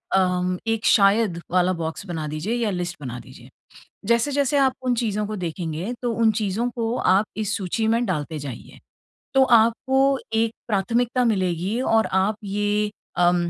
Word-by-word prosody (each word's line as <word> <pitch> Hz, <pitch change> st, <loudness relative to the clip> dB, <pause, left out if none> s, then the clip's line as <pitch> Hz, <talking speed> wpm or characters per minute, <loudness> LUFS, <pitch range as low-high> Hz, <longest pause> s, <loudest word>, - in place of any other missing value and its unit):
अ, 180 Hz, -1 st, +1 dB
एक 225 Hz, -1 st, -1 dB
शायद 200 Hz, -3 st, +4 dB
वाला 180 Hz, +1 st, +3 dB
बॉक्स 165 Hz, +3 st, -5 dB
बना 160 Hz, -3 st, -4 dB
दीजिए 155 Hz, +10 st, -3 dB
या 235 Hz, -3 st, 0 dB
लिस्ट 175 Hz, -1 st, -3 dB
बना 125 Hz, -3 st, -6 dB
दीजिए। 120 Hz, -, -14 dB, 0.6 s
जैसे-जैसे 275 Hz, +5 st, +2 dB
आप 265 Hz, -2 st, +3 dB
उन 250 Hz, -1 st, +1 dB
चीज़ों 210 Hz, -3 st, -1 dB
को 215 Hz, -, -4 dB
देखेंगे, 175 Hz, +2 st, -4 dB
तो 245 Hz, -2 st, -1 dB
उन 225 Hz, -1 st, +3 dB
चीज़ों 215 Hz, +2 st, -1 dB
को 230 Hz, 0 st, -1 dB
आप 190 Hz, +3 st, +3 dB
इस 215 Hz, -2 st, -1 dB
सूची 215 Hz, +3 st, -1 dB
में 230 Hz, +2 st, +2 dB
डालते 155 Hz, -4 st, -3 dB
जाइए। 140 Hz, -4 st, -9 dB, 0.5 s
तो 270 Hz, -, +6 dB
आपको 265 Hz, +3 st, +3 dB
एक 225 Hz, 0 st, +2 dB, 0.2 s
प्राथमिकता 235 Hz, +4 st, +1 dB
मिलेगी 190 Hz, 0 st, 0 dB
और 225 Hz, -3 st, +2 dB
आप 190 Hz, +3 st, +2 dB
ये 205 Hz, +1 st, 0 dB, 0.3 s
अम 175 Hz, 0 st, +4 dB
210 Hz, 160 wpm, -23 LUFS, 180-230 Hz, 0.6 s, तो